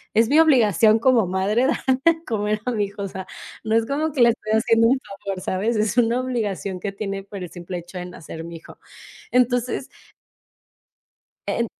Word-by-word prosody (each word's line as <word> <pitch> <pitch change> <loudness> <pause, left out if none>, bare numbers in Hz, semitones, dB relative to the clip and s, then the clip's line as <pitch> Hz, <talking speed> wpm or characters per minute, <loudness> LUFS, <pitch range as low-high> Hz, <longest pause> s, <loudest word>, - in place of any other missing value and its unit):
es 225 +1 +4
mi 300 +3 +5
obligación 225 - +5
como 235 -5 +3
madre 200 +7 +1
dar - - 0 0.3
de 330 0 +3
comer 210 -2 -1
a 250 - 0
mi 210 -4 0
hijo. 200 0 -7
O - - -2
sea, 190 0 -7 0.4
no 220 0 0
es 225 0 +3
como 300 +4 -1
que 270 - 0
le 235 - +7
estoy 220 -2 -2
haciendo 230 0 +4
un 260 +2 +3 0.3
favor, 195 -2 -3
¿sabes? 205 +6 -1
Es 215 0 0
una 235 +1 +3
obligación 205 -7 -3
que 200 +2 -4
tiene 195 -1 -4
por 200 -1 -8
el 175 - -8
simple 175 0 -6
hecho 175 +2 -11
de 180 - -5
nacer 165 -2 -9
mi 170 0 -8
hijo, 165 - -15 0.5
entonces 250 +1 +1 1.6
en 235 - 0
220 Hz, 195 wpm, -22 LUFS, 195-245 Hz, 1.6 s, le